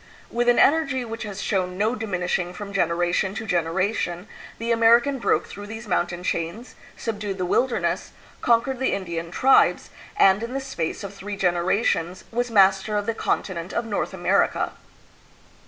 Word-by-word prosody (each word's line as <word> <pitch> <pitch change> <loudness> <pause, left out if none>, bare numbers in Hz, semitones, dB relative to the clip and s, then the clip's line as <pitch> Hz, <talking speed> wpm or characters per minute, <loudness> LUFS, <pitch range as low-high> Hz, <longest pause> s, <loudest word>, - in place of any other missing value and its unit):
With 240 +1 +1
an 245 - +4
energy 275 -4 +3
which 225 0 -6
has 200 0 -6
shown 185 -2 -1
no 215 +4 +1
diminishing 180 -5 -2
from 200 -1 -7
generation 175 +1 +1
to 225 - -4
generation, 180 +1 -1 0.3
the 230 +1 -2
American 235 +4 +4
broke - - +1
through 205 0 -9
these 225 +1 -8
mountain 175 -1 -1
chains, 175 +8 -3 0.2
subdued 205 -3 -4
the 185 - -1
wilderness, 245 +7 0 0.3
conquered 245 +2 +2
the 265 - +1
Indian 170 -3 -4
tribes, 265 +9 +3 0.3
and 195 - +5
in 235 +3 -5
the - - 0
space 210 -11 -4
of 200 0 -6
three 200 +1 -6
generations 180 0 0
was 245 +1 -1
master 195 0 +4
of 205 - -1
the 230 - 0
continent 180 -5 -2
of 235 - -1
North 210 -3 -2
America. - - +1
205 Hz, 155 wpm, -24 LUFS, 180-230 Hz, 0.3 s, and